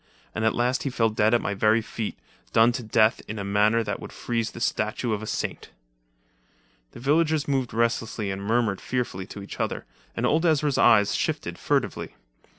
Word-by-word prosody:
And 110 - -3
at 110 - +2
last 125 +2 +1
he 140 - -2
fell 115 -3 +1
dead 110 +1 +3
at 120 - +1
my 105 - -1
very 110 +3 +3
feet, 110 -1 -5 0.4
done 115 +2 +6
to 125 +1 -4
death 110 0 +2
in 110 - -5
a 100 - -3
manner 105 +3 +2
that - - -3
would - - -9
freeze 115 -2 -2
the - - -10
statue 110 0 -1
of 105 - -2
a 110 - -6
saint." - - -4 1.2
The - - -10
villagers 155 +3 +2
moved 135 -3 0
restlessly 115 -2 -1
and 95 0 -5
murmured 110 -1 0
fearfully 120 -7 -3
to 100 - -8
each 100 - -9
other, - - -2 0.3
and - - 0
old 160 +2 +2
Ezra's 150 -4 +2
eyes 105 -3 +5
shifted - - -2
furtively. - - -1
115 Hz, 190 wpm, -25 LUFS, 105-125 Hz, 1.2 s, done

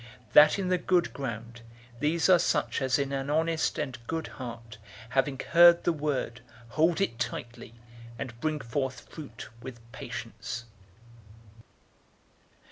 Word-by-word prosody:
008:015 - - -27
That 150 +4 +8
in 190 -2 -1
the 180 - +3
good 180 -1 +1
ground, 115 -3 -6 0.4
these 160 +3 +2
are 185 -2 +7
such 150 -3 0
as 130 -1 +2
in 140 -1 -1
an 135 0 -2
honest 160 +1 +1
and 130 -4 -3
good 160 -1 -2
heart, 115 -4 -8 0.3
having 135 +1 +1
heard 170 0 +8
the 175 - +2
word, 145 -5 -2 0.3
hold 160 +7 +2
it 115 -12 -1
tightly, 120 -1 -5 0.4
and 120 -1 -6
bring 155 -1 0
forth 130 +2 -3
fruit 155 -4 -10
with 125 -1 -8
patience. 115 +1 -6
140 Hz, 135 wpm, -29 LUFS, 120-160 Hz, 0.4 s, That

